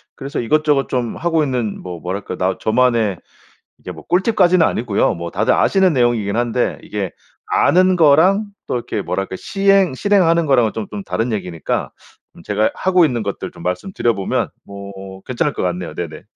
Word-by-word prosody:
그래서 140 +3 -5
이것저것 145 +2 +1
좀 120 -3 -2
하고 165 -2 +1
있는 125 -7 -2
뭐 90 -2 -7
뭐랄까 95 +4 -5
나 95 0 0
저만의 115 -4 +2 0.6
이게 - - -8
뭐 - - -13
꿀팁까지는 185 -2 +3
아니고요. 110 -3 0
뭐 85 -1 -6
다들 110 +6 +1
아시는 190 -2 +3
내용이긴 120 -6 +1
한데 120 +1 0
이게 100 -4 -4 0.4
아는 185 +1 +3
거랑 175 +7 +4 0.2
또 - - -3
이렇게 120 - -3
뭐랄까 95 -1 -3
시행 195 - +2
실행하는 170 -1 +2
거랑은 125 -6 +3
좀 110 -2 -4
좀 105 -1 -5
다른 115 +2 -2
얘기니까 90 -6 -3 0.5
제가 105 +1 +1
하고 185 -2 +3
있는 120 -7 0
것들 100 -1 -4
좀 - - -13
말씀드려 115 - -1
보면 95 -1 -1 0.2
뭐 100 -1 -9
괜찮을 140 +4 -1
것 - - -4
같네요. 90 -1 -3
네네. 80 -3 -6
120 Hz, 365 characters per minute, -18 LUFS, 100-165 Hz, 0.6 s, 거랑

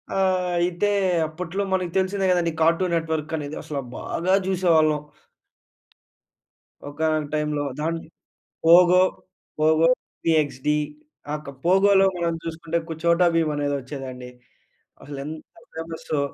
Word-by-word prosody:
ఆ! - - 0 0.4
అయితే 175 +4 +1 0.4
అప్పట్లో 180 +5 -4
మనకు 185 -2 0
తెలిసిందే 190 +1 +1
కదండీ 175 -2 +1
కార్టూన్ 170 +2 +2
నెట్వర్క్ 160 -1 -2
అనేది 145 0 -5
అసలు 140 -2 -4 0.2
బాగా 185 +3 -1
చూసేవాళ్ళం. 165 -5 +3 1.9
ఒకానొక 155 0 -1
టైమ్‌లో 150 -1 -1 0.2
దాన్ 165 +2 -1 0.7
పోగో, 180 +2 +7 0.6
పోగో, 155 +1 +4 0.4
పీ-ఎక్స్‌-డి 150 -3 +1 0.6
ఆహ్ 150 0 -4
క - - -5
పోగో‌లో 195 +2 +5
మనం 170 -1 -1
చూసుకుంటే 165 0 -3
కు 165 - -4
చోటా 170 +1 +4
భీమ్ 160 -2 +2
అనేది 145 -1 -1
వచ్చేదండి. 130 -2 -8 0.7
అసలు 145 -1 -8
ఎంత 155 +1 -7 0.3
ఫేమస్సో! 160 -2 -4
160 Hz, 115 wpm, -23 LUFS, 150-175 Hz, 1.9 s, పోగో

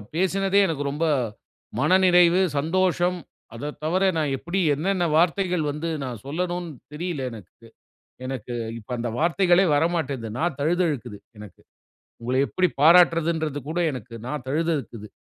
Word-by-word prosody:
பேசினதே 195 +2 +2
எனக்கு 155 -4 -2
ரொம்ப 150 +4 -1 0.7
மனநிறைவு, 180 -1 +5 0.2
சந்தோஷம். 180 +3 +1 0.4
அதை 145 +6 -5
தவிர 185 +5 +2
நான் 150 -3 0
எப்புடி 175 +7 -3
என்னென்ன 175 +5 0
வார்த்தைகள் 175 0 +1
வந்து 150 +3 -4
நான் 120 -5 -6
சொல்லணும்னு 175 +4 -3 0.2
தெரியல 165 -1 -4
எனக்கு. 105 -7 -13 0.6
எனக்கு 130 -1 -5 0.3
இப்ப 105 - -19
அந்த 120 0 -3
வார்த்தைகளே 175 +3 +3
வரமாட்டேங்குது. 145 -8 -1
நா - - -1 0.2
தழுதழுக்குது 150 - -1 0.2
எனக்கு. 105 -2 -12 0.6
உங்கள 125 +2 -2
எப்படி 185 +4 +1
பாராட்டுறதுன்றது 165 -2 +4
கூட 165 +3 -1
எனக்கு 125 -2 -8
நா 130 - -4 0.2
தழுதக்குது. 145 -8 -2
165 Hz, 120 wpm, -24 LUFS, 140-180 Hz, 0.7 s, மனநிறைவு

